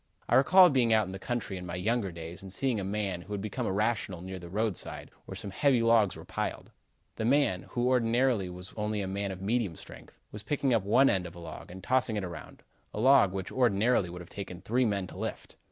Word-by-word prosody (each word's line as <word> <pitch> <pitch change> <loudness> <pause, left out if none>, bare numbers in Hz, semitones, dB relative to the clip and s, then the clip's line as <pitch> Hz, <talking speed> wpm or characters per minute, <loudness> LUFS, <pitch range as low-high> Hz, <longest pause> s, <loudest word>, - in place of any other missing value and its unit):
I - - -1
recall 180 +7 +7
being 125 -4 +2
out 110 -1 +4
in 95 - -7
the 95 - -7
country 120 -4 -3
in 90 - -7
my 85 - -4
younger 100 +2 0
days 85 +2 -8
and 95 -1 -9
seeing 125 +1 0
a - - -3
man, 100 -2 -2
who 100 +4 -8
had 100 - -2
become 110 +4 -3
irrational, 100 -3 -1
near 95 0 -6
the 85 -1 -10
roadside, 105 0 -3
where - - -8
some 100 - -6
heavy 125 +4 +2
logs 115 -5 +4
were - - -10
piled. - - -4 0.5
This 110 - -1
man, 130 -9 +2
who 120 0 0
ordinarily 120 -4 +2
was 90 +1 -9
only 105 -1 -2
a 95 - -3
man 100 +1 -3
of 95 0 -7
medium 105 -4 0
strength, - - -13
was 105 - -7
picking 135 +2 0
up 115 - +3
one 115 +8 +4
end 95 -6 +1
of 85 - -12
a - - -10
log 80 -2 -9
and 95 +1 -10
tossing 130 -3 +1
it 105 - -2
around 85 -4 -9 0.3
a - - -3
log, 130 -5 +6
which, 95 -1 -5
ordinarily, 115 -5 +2
would 90 +1 -8
have 85 - -12
taken 95 -3 -7
three 125 +6 +1
men 100 -4 0
to - - -11
lift. - - -5
105 Hz, 235 wpm, -29 LUFS, 95-120 Hz, 0.5 s, recall